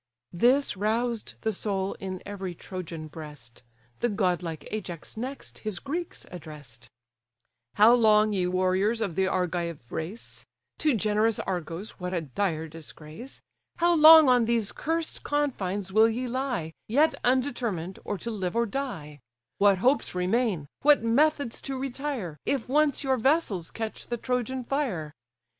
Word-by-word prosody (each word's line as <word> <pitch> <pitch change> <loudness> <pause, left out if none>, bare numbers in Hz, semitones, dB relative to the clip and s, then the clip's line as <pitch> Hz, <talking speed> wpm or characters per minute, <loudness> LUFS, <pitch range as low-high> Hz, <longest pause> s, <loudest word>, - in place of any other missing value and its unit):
This 250 +10 +3
roused 225 +3 -1
the 220 -1 0
soul 195 -1 -2
in 185 -2 -5
every 195 -3 -5
Trojan 165 -3 -7
breast: 150 -7 -11 0.4
The 240 - +1
godlike 180 -6 -1
Ajax 180 -6 -5
next 255 +5 -6
his 215 -4 -3
Greeks 325 - -5
address'd: 150 -8 -10 0.9
"How 215 +3 +7
long, 215 -3 +5
ye 185 -2 +1
warriors 185 +5 +1
of 205 -6 -1
the 190 +3 +1
Argive 170 -8 -2
race, 175 +8 -5 0.4
(To 300 -5 +3
generous 215 +1 +2
Argos 180 +2 -5
what 180 0 -3
a 170 - 0
dire 160 +2 -2
disgrace!) 160 - -10 0.3
How 345 0 +3
long 315 -1 +9
on 250 -2 +5
these 230 -3 +1
cursed 325 +1 -2
confines 205 -10 -1
will 220 +2 +6
ye 245 +3 -2
lie, 245 - -2
Yet 290 +8 +3
undetermined, 240 -9 0
or 205 - -3
to 235 +6 -4
live 190 -4 -3
or 235 0 +3
die? 195 - -5 0.4
What 200 -1 +5
hopes 255 +1 +1
remain, 185 - +1 0.2
what 290 -4 +5
methods 280 +1 +2
to 270 -1 -4
retire, 260 - -4
If 270 -5 -1
once 295 +1 +2
your 265 -1 +2
vessels 230 - +1
catch 225 -1 -5
the 240 - -2
Trojan 250 +1 -2
fire? 235 - -2
215 Hz, 145 wpm, -27 LUFS, 180-255 Hz, 0.9 s, long